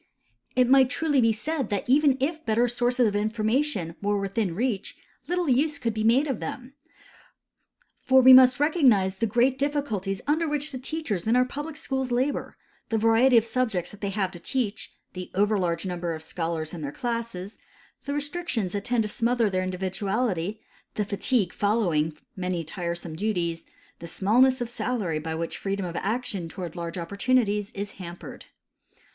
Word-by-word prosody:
It 250 Hz, -1 st, +4 dB
might 265 Hz, 0 st, +6 dB
truly 290 Hz, -2 st, +1 dB
be 230 Hz, -1 st, +4 dB
said 270 Hz, +3 st, -3 dB
that 200 Hz, -2 st, -2 dB
even 275 Hz, +1 st, +4 dB
if 315 Hz, +4 st, -2 dB
better 230 Hz, +2 st, +2 dB
sources 245 Hz, 0 st, +1 dB
of 205 Hz, -, -1 dB
information 215 Hz, -, 0 dB
were 205 Hz, 0 st, +1 dB
within 195 Hz, -2 st, -2 dB
reach 230 Hz, -1 st, -2 dB, 0.3 s
little 355 Hz, -1 st, 0 dB
use 285 Hz, +3 st, +2 dB
could 230 Hz, -4 st, -2 dB
be 215 Hz, 0 st, -2 dB
made 240 Hz, +6 st, +4 dB
of 270 Hz, -6 st, -2 dB
them; 250 Hz, +11 st, -6 dB, 1.3 s
for 260 Hz, 0 st, +5 dB
Ave 260 Hz, +1 st, +9 dB
must 255 Hz, 0 st, +8 dB
recognize 250 Hz, -, +3 dB
the 230 Hz, -, 0 dB
great 245 Hz, +5 st, +2 dB
difficulties 245 Hz, -10 st, -1 dB
under 315 Hz, +3 st, +1 dB
Avhich 295 Hz, 0 st, -1 dB
the 260 Hz, -, -5 dB
teachers 255 Hz, -, -3 dB
in 230 Hz, -, +3 dB
our 250 Hz, 0 st, +4 dB
public 295 Hz, +4 st, -6 dB
schools 265 Hz, -4 st, -3 dB
labor: 255 Hz, +4 st, -1 dB, 0.3 s
the 225 Hz, -, +1 dB
variety 230 Hz, +3 st, +5 dB
of 225 Hz, -, +4 dB
subjects 225 Hz, -7 st, -1 dB
that 205 Hz, -, -14 dB
they 200 Hz, -, -1 dB
have 195 Hz, -2 st, -1 dB
to 175 Hz, -, -10 dB
teach, 220 Hz, +2 st, -3 dB, 0.2 s
the 185 Hz, -1 st, -7 dB
overlarge 190 Hz, -4 st, +1 dB
number 175 Hz, -2 st, -3 dB
of 155 Hz, -, -9 dB
scholars 160 Hz, -1 st, -3 dB
in 170 Hz, -, -6 dB
their 140 Hz, -2 st, -4 dB
classes, 230 Hz, -3 st, -4 dB, 0.5 s
the 285 Hz, -, -2 dB
restrictions 290 Hz, -, -2 dB
that 205 Hz, -1 st, -3 dB
tend 245 Hz, -2 st, +1 dB
to -, -, -2 dB
smother 230 Hz, 0 st, +1 dB
their 185 Hz, 0 st, 0 dB
individuality, 190 Hz, +2 st, -2 dB, 0.3 s
the 210 Hz, -, 0 dB
fatigue 200 Hz, -1 st, 0 dB
following 175 Hz, -8 st, +1 dB, 0.2 s
many 180 Hz, -2 st, -2 dB
tiresome 170 Hz, 0 st, -5 dB
duties, 170 Hz, -4 st, -1 dB, 0.4 s
the 170 Hz, -, -8 dB
smallness 245 Hz, +9 st, +3 dB
of 240 Hz, -, -1 dB
salary 215 Hz, -8 st, -2 dB
by 160 Hz, +1 st, -4 dB
which 165 Hz, +1 st, -4 dB
freedom 195 Hz, -1 st, -2 dB
of 170 Hz, -1 st, -6 dB
action 205 Hz, -5 st, -2 dB
toAvard 175 Hz, -2 st, -7 dB
large 170 Hz, 0 st, -5 dB
opportunities 205 Hz, +3 st, 0 dB
is 205 Hz, +1 st, -5 dB
hampered. 175 Hz, 0 st, -9 dB
220 Hz, 170 wpm, -26 LUFS, 185-255 Hz, 1.3 s, Ave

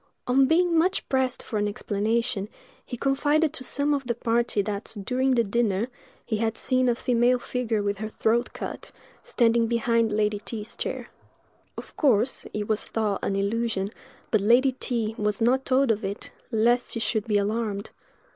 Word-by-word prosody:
On 265 Hz, +2 st, +4 dB
being 340 Hz, +2 st, +3 dB
much 370 Hz, +4 st, +1 dB
pressed 260 Hz, -1 st, +1 dB
for 215 Hz, -, -3 dB
an 205 Hz, -, +1 dB
explanation, 210 Hz, +1 st, -1 dB, 0.3 s
he 245 Hz, -, -7 dB
confided 290 Hz, +4 st, +2 dB
to 280 Hz, -, -6 dB
some 285 Hz, +3 st, 0 dB
of 275 Hz, -3 st, -2 dB
the 235 Hz, -, 0 dB
party 230 Hz, -3 st, 0 dB
that, 205 Hz, +2 st, -5 dB
during 260 Hz, +3 st, +1 dB
the 235 Hz, -, +3 dB
dinner, 220 Hz, 0 st, 0 dB, 0.4 s
he 220 Hz, -, -1 dB
had 225 Hz, 0 st, -1 dB
seen 255 Hz, -1 st, +2 dB
a 240 Hz, -, +2 dB
female 245 Hz, +1 st, +2 dB
figure 235 Hz, -4 st, -2 dB
with 200 Hz, 0 st, -1 dB
her 215 Hz, 0 st, -4 dB
throat 230 Hz, +2 st, 0 dB
cut, -, -, -7 dB, 0.3 s
standing 235 Hz, -, +2 dB
behind 230 Hz, -1 st, +1 dB
Lady 210 Hz, 0 st, +1 dB
T——'s 215 Hz, 0 st, -6 dB
chair. -, -, -4 dB, 0.7 s
Of -, -, -9 dB
course, 260 Hz, -3 st, +2 dB
it 210 Hz, -1 st, -3 dB
was 215 Hz, -1 st, 0 dB
thought 215 Hz, -3 st, -1 dB
an 195 Hz, -, 0 dB
illusion, 200 Hz, 0 st, -1 dB, 0.4 s
but 215 Hz, -, +3 dB
Lady 245 Hz, +6 st, +4 dB
T—— 235 Hz, -4 st, -2 dB
was 210 Hz, -1 st, 0 dB
not 255 Hz, +3 st, +2 dB
told 260 Hz, -1 st, +3 dB
of 215 Hz, 0 st, -1 dB
it, 200 Hz, +2 st, -5 dB, 0.2 s
lest 240 Hz, +1 st, +2 dB
she 230 Hz, -, -2 dB
should 220 Hz, -1 st, 0 dB
be 210 Hz, -2 st, +2 dB
alarmed. 205 Hz, 0 st, -2 dB
230 Hz, 175 wpm, -26 LUFS, 210-255 Hz, 0.7 s, On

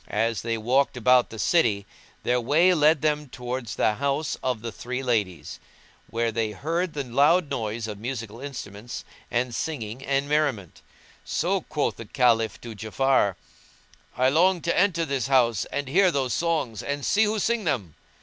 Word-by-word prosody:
[FN#172] -, -, -13 dB
As 115 Hz, +1 st, +1 dB
they 115 Hz, 0 st, -2 dB
walked 125 Hz, +4 st, +1 dB
about 125 Hz, +1 st, +4 dB
the 110 Hz, -, -9 dB
city, 110 Hz, -, +2 dB, 0.4 s
their 125 Hz, 0 st, +1 dB
way 160 Hz, +9 st, +4 dB
led 155 Hz, -1 st, +3 dB
them 150 Hz, -2 st, 0 dB
towards 125 Hz, -2 st, -5 dB
the 110 Hz, -, +2 dB
house 140 Hz, +5 st, -1 dB
of 125 Hz, -4 st, -2 dB
the 115 Hz, -, -4 dB
three 125 Hz, +4 st, -5 dB
ladies; 105 Hz, -8 st, -2 dB, 0.5 s
where 115 Hz, 0 st, 0 dB
they 110 Hz, -1 st, -1 dB
heard 165 Hz, -, -2 dB
the 145 Hz, -, -2 dB
loud 145 Hz, +6 st, +3 dB
noise 110 Hz, -3 st, -2 dB
of 105 Hz, -2 st, -6 dB
musical 115 Hz, -1 st, -5 dB
instruments 120 Hz, -5 st, -7 dB, 0.2 s
and 120 Hz, 0 st, -1 dB
singing 125 Hz, -4 st, -4 dB
and 140 Hz, 0 st, 0 dB
merriment; 145 Hz, -, -1 dB, 0.4 s
so 185 Hz, +3 st, 0 dB
quoth 150 Hz, -2 st, -2 dB
the 115 Hz, -, -8 dB
Caliph 115 Hz, -3 st, +2 dB
to 120 Hz, -1 st, -7 dB
Ja'afar, 110 Hz, -1 st, +1 dB, 0.8 s
"I 130 Hz, +1 st, +4 dB
long 175 Hz, +5 st, +3 dB
to 170 Hz, -, 0 dB
enter 175 Hz, -3 st, +2 dB
this 135 Hz, -6 st, -1 dB
house 120 Hz, -6 st, +3 dB
and 145 Hz, -1 st, -4 dB
hear 185 Hz, +7 st, +4 dB
those 135 Hz, -7 st, -1 dB
songs 155 Hz, -10 st, -1 dB
and 140 Hz, -1 st, -3 dB
see 220 Hz, +2 st, +3 dB
who 215 Hz, +1 st, 0 dB
sing 225 Hz, 0 st, 0 dB
them." 105 Hz, -, -1 dB
130 Hz, 170 wpm, -25 LUFS, 115-150 Hz, 0.8 s, about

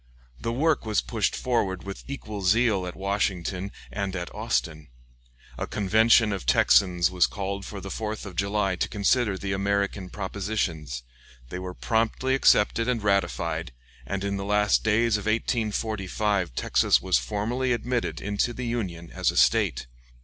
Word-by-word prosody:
The 115 Hz, -, -2 dB
work 150 Hz, +5 st, +1 dB
was 110 Hz, -2 st, +1 dB
pushed -, -, -1 dB
forward 105 Hz, -7 st, -1 dB
with 100 Hz, 0 st, -7 dB
equal 110 Hz, -7 st, -6 dB
zeal 100 Hz, -1 st, +2 dB
at 90 Hz, -, -6 dB
Washington 95 Hz, -1 st, -2 dB, 0.2 s
and 100 Hz, -2 st, -3 dB
at 90 Hz, -1 st, -5 dB
Austin. 75 Hz, +5 st, -2 dB, 0.7 s
A -, -, -2 dB
convention 110 Hz, +2 st, +4 dB
of 95 Hz, -, -4 dB
Texans 90 Hz, +6 st, +4 dB
was 90 Hz, -2 st, +3 dB
called 100 Hz, -1 st, -4 dB
for 100 Hz, -, -7 dB
the 100 Hz, -, -7 dB
4th 110 Hz, +1 st, -4 dB
of 95 Hz, -3 st, -8 dB
July 100 Hz, -1 st, 0 dB
to -, -, -1 dB
consider 105 Hz, 0 st, +1 dB
the 95 Hz, 0 st, -4 dB
American 100 Hz, -1 st, -1 dB
propositions; 95 Hz, -, -3 dB, 0.5 s
they 90 Hz, -, -5 dB
were 90 Hz, -1 st, -6 dB
promptly 115 Hz, +3 st, 0 dB
accepted 115 Hz, -3 st, +3 dB
and 120 Hz, -4 st, 0 dB
ratified, 85 Hz, -7 st, 0 dB, 0.3 s
and 100 Hz, 0 st, -4 dB
in 100 Hz, 0 st, -1 dB
the 100 Hz, -, -4 dB
last 105 Hz, +1 st, +2 dB
days 110 Hz, 0 st, +3 dB
of 105 Hz, 0 st, -6 dB
1845 105 Hz, -, -1 dB
Texas -, -, +3 dB
was -, -, +2 dB
formally 110 Hz, -, -1 dB
admitted 120 Hz, +1 st, -1 dB
into 105 Hz, +4 st, -1 dB
the 125 Hz, +1 st, -5 dB
Union 95 Hz, -9 st, -4 dB
as -, -, 0 dB
a -, -, -3 dB
State. -, -, +3 dB
100 Hz, 155 wpm, -26 LUFS, 95-110 Hz, 0.7 s, convention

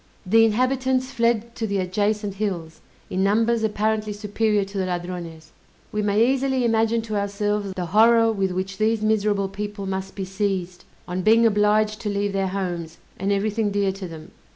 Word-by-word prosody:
The 225 Hz, +5 st, +5 dB
inhabitants 255 Hz, +3 st, +1 dB
fled 235 Hz, -2 st, 0 dB
to 225 Hz, -, -3 dB
the 200 Hz, -1 st, -1 dB
adjacent 205 Hz, +2 st, -1 dB
hills, 170 Hz, -6 st, -3 dB, 0.3 s
in 185 Hz, +1 st, 0 dB
numbers 225 Hz, +3 st, +2 dB
apparently 215 Hz, 0 st, 0 dB
superior 210 Hz, 0 st, 0 dB
to 200 Hz, +1 st, -8 dB
the 185 Hz, -, -1 dB
Ladrones. 175 Hz, -3 st, -5 dB, 0.4 s
We 210 Hz, -, -1 dB
may 210 Hz, +2 st, +3 dB
easily 265 Hz, -1 st, +1 dB
imagine 225 Hz, 0 st, +2 dB
to 215 Hz, -1 st, -4 dB
ourselves 205 Hz, 0 st, -1 dB
the 180 Hz, -, -3 dB
horror 225 Hz, +4 st, +5 dB
with 195 Hz, -3 st, 0 dB
which 190 Hz, +2 st, -4 dB
these 215 Hz, 0 st, +1 dB
miserable 210 Hz, -2 st, +1 dB
people 205 Hz, +1 st, -5 dB
must 190 Hz, 0 st, -4 dB
be 195 Hz, -2 st, -4 dB
seized, 190 Hz, -2 st, -3 dB, 0.2 s
on 180 Hz, +1 st, -2 dB
being 225 Hz, +4 st, +5 dB
obliged 215 Hz, 0 st, +2 dB
to 210 Hz, -, -2 dB
leave 200 Hz, 0 st, -1 dB
their 195 Hz, -1 st, 0 dB
homes, 175 Hz, -4 st, -4 dB, 0.2 s
and 195 Hz, +2 st, 0 dB
everything 210 Hz, +2 st, 0 dB
dear 200 Hz, -1 st, +1 dB
to 190 Hz, -1 st, -7 dB
them. 160 Hz, -2 st, -10 dB
205 Hz, 175 wpm, -23 LUFS, 190-220 Hz, 0.4 s, The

